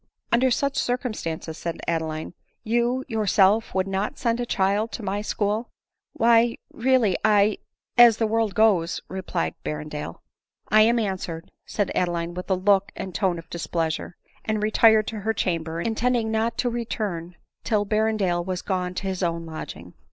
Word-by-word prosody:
" - - -47
Under 255 +2 +4
such 280 +2 0
circumstances," 210 -10 -3
said 170 -1 -4
Adeline, 160 -1 -2 0.3
"you 240 +3 0
your 220 -4 -2
self 200 +3 +3
would 190 -1 +2
not 195 +7 -2
send 235 -1 0
a 240 - -2
child 200 +3 +1
to 230 - -5
my 200 +1 -2
school 215 +2 -1 0.2
?" - - -61
" - - -65
Why 230 0 +4
— - - -30
really 235 -6 +2
— - - -36 0.2
I 210 0 0 0.2
— - - -52
as 235 -2 +8
the 225 - +1
world 220 -2 0
goes" 195 -6 +3
— - - -45
replied 180 -2 -2
Ber 150 - -2
rendale. 150 - -6 0.3
" - - -68
I 215 +2 +6
am 230 +2 +4
answered," 185 -6 -3 0.2
said 205 -2 -1
Adeline 175 -1 -1
with 180 +2 -7
a 190 - +3
look 195 +1 +2
and 190 - -6
tone 185 -2 0
of 165 0 -10
displeasure; 165 0 -2 0.3
and 215 -1 -1
retired 215 0 +5
to 220 - -5
her 220 +2 -1
chamber, 165 -3 -1
intending 230 +3 0
not 225 +1 0
to 245 - +1
return 205 -7 -4 0.3
till 210 -2 +1
Berrendale 215 -4 +1
was 185 0 -4
gone 185 -2 -2
to 195 - -3
his 190 -1 -3
own 170 -2 -1
lodging. 160 -1 -8
205 Hz, 190 wpm, -24 LUFS, 175-225 Hz, 0.3 s, as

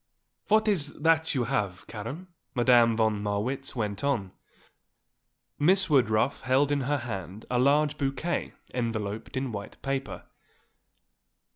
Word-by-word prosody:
"What 215 +1 +3
is 160 -9 +1
that 160 -1 +3
you 130 - +1
have, 100 -4 -2
Karen?" 135 - -7 0.3
Madame 120 -2 +5
von 110 -2 +1
Marwitz 110 +8 -2
went 105 -2 -3
on. 120 -10 0 1.3
Miss 185 +3 +3
Woodruff 120 -2 +2
held 135 +2 +2
in 145 -1 +1
her 145 - +2
hand 100 -5 -6
a 125 - +2
large 145 +3 +3
bouquet 140 +5 -2 0.2
enveloped 110 -1 -3
in 130 -1 -2
white 100 -2 -7
paper. 135 0 -3
130 Hz, 125 wpm, -28 LUFS, 110-145 Hz, 1.3 s, Madame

